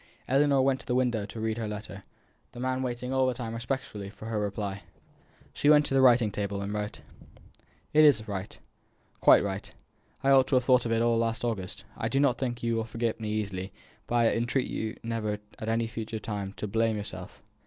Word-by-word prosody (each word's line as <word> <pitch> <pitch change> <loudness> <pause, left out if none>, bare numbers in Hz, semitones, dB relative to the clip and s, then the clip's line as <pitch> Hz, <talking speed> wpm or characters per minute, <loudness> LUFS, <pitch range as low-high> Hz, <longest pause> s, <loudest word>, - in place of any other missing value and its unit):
Ellinor 140 0 +4
went 135 0 +2
to - - -13
the 125 - 0
window 120 -5 +1
to 110 - -8
read 110 +1 -1
her 110 - -2
letter; 105 -2 -7 0.5
the 120 - -9
man 130 +1 -1
waiting 125 0 -3
all 130 -1 +3
the 130 - 0
time 115 -2 -5
respectfully 115 -4 -4
for 110 - -12
her 110 -1 -2
reply. 100 -1 -3 0.7
She 145 - +2
went 150 -1 +7
to - - -2
the 135 - +4
writing 120 -4 +5
table, 100 0 -3
and 100 +1 -4
wrote: 105 0 -4 0.9
"It 155 +1 +7
is 145 -7 +6
all - - -11
right 100 -2 -5 0.6
quite - - +7
right. 100 0 -4 0.5
I 135 - +4
ought 135 -1 +6
to 135 - +2
have 125 - +4
thought 125 -1 +4
of - - -2
it 115 0 +2
all 115 -1 +3
last 115 +1 -1
August. 100 -6 -4
I - - -2
do 135 - +1
not 135 -4 +3
think 120 -3 -3
you 115 0 +1
will 115 - 0
forget 115 0 -2
me 110 -1 -4
easily, 100 -3 -3 0.3
but 120 - -2
I 115 -1 +4
entreat 120 +3 0
you 110 0 -3
never 115 -2 -2 0.2
at 110 - -4
any 115 +1 +1
future 115 0 -5
time 100 -3 -4
to 105 - -5
blame 115 +1 +1
yourself. 95 -3 -7
115 Hz, 215 wpm, -28 LUFS, 105-125 Hz, 0.9 s, went